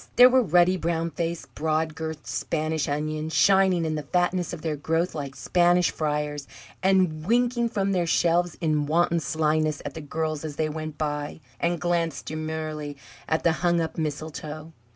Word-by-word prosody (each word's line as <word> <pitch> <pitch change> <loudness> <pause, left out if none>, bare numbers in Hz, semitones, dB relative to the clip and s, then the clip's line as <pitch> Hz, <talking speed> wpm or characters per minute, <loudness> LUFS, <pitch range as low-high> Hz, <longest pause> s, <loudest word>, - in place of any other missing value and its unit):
There 250 +1 +8
were 260 0 +5
ruddy, 180 -2 +4
brown 165 -1 -1
faced, 170 0 -4
broad 155 0 0
girthed 160 -1 -6
Spanish 155 -2 -2
onions, 155 +2 -2
shining 190 -3 +4
in 160 - -1
the 155 - -2
fatness 175 +3 0
of 170 -3 -7
their 160 -2 -1
growth 165 +4 -1
like 140 -3 -5
Spanish 175 0 +3
friars, 150 -2 -2 0.3
and 185 -5 +2
winking, 240 +1 +2
from 195 -3 0
their 180 -3 +1
shelves, 175 +1 +2
in 155 -3 0
wanton 170 +2 +2
slyness 155 0 0
at 145 - -4
the 160 - -7
girls 155 0 -3
as 155 -2 -5
they 155 +1 0
went 155 0 -5
by, 150 0 -3 0.2
and 170 0 0
glanced 170 -4 -1
demurely 155 -2 -4 0.3
at 160 - +1
the 170 - +4
hung 175 -1 +3
up 160 -1 -2
mistletoe. 155 +1 -5
160 Hz, 170 wpm, -25 LUFS, 155-175 Hz, 0.3 s, There